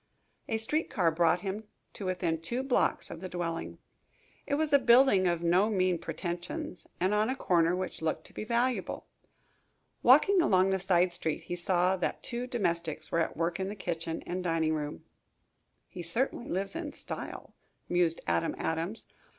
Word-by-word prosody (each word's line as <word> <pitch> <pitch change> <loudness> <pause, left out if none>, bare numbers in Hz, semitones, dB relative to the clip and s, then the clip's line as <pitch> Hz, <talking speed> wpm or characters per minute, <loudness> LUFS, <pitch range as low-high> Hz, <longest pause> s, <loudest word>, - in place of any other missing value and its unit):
A 225 - +1
street 300 +9 -1
car 175 -5 +2
brought 170 +1 +2
him 200 +3 -4 0.3
to 195 - -5
within 170 -3 -1
two 240 +10 -2
blocks 270 -2 +1
of 165 - -7
the 185 - -5
dwelling. 170 -2 -4 0.7
It 285 - +1
was 305 0 0
a 280 - +8
building 240 -6 +5
of 170 -1 0
no 180 +5 +4
mean 185 -4 +1
pretentions 175 +1 -5
and 185 +3 +2
on 210 +2 +2
a 260 - 0
corner 170 -7 +2
which 185 -2 -4
looked 160 0 -2
to - - -13
be - - -5
valuable. 240 +3 -1 0.9
Walking 395 -2 +6
along 190 - +4
the 190 - +1
side 180 -1 +3
street 160 -3 -2
he 175 - -4
saw 180 +1 +2
that 180 - -2
two 245 0 -3
domestics 170 -9 -1
were 165 - +2
at 165 - -1
work 170 +2 -1
in 190 0 -2
the 205 - -5
kitchen 165 -4 -4
and 180 +1 -4
dining 165 -2 +1
room. 150 -1 -4 0.8
"He 180 - -8
certainly 235 +8 -2
lives 195 - -2
in 330 -3 -4
style," - - -7 0.3
mused 175 -2 +1
Adam 85 0 0
Adams. 165 +7 -2
185 Hz, 175 wpm, -30 LUFS, 170-220 Hz, 0.9 s, a